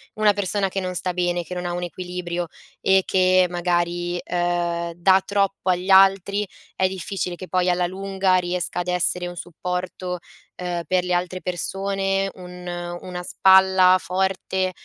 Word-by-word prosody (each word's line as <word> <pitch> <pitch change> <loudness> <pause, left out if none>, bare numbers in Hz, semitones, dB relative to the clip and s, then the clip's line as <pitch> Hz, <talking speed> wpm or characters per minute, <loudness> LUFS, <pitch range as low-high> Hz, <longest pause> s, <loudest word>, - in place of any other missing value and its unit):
una 215 -1 +4
persona 200 0 0
che 195 - -3
non 185 -1 -3
sta 180 0 -2
bene, 175 0 0
che 180 - -7
non 180 0 -4
ha 175 - -2
un 175 - -3
equilibrio, 175 0 -4 0.4
e 190 0 +4
che 185 0 +3
magari, 175 0 -1
uhm, 175 -1 -1
dà 185 +3 +4
troppo 195 -2 0
agli 180 +1 -2
altri, 195 +1 +5 0.3
è 190 - +2
difficile 185 -1 -4
che 185 +1 -9
poi 180 0 +1
alla 175 0 +1
lunga 190 0 0
riesca 180 -1 0
ad 175 - -4
essere 180 0 0
un 175 0 -6
supporto, 180 +1 -4 0.4
uhm, 175 -1 -2
per 185 -1 +2
le 180 0 -1
altre 180 +1 -2
persone, 195 +2 -1
un 180 -1 -10 0.3
una 180 -1 -6
spalla 190 0 +5
forte, 190 0 -1
180 Hz, 160 wpm, -23 LUFS, 175-190 Hz, 0.4 s, altri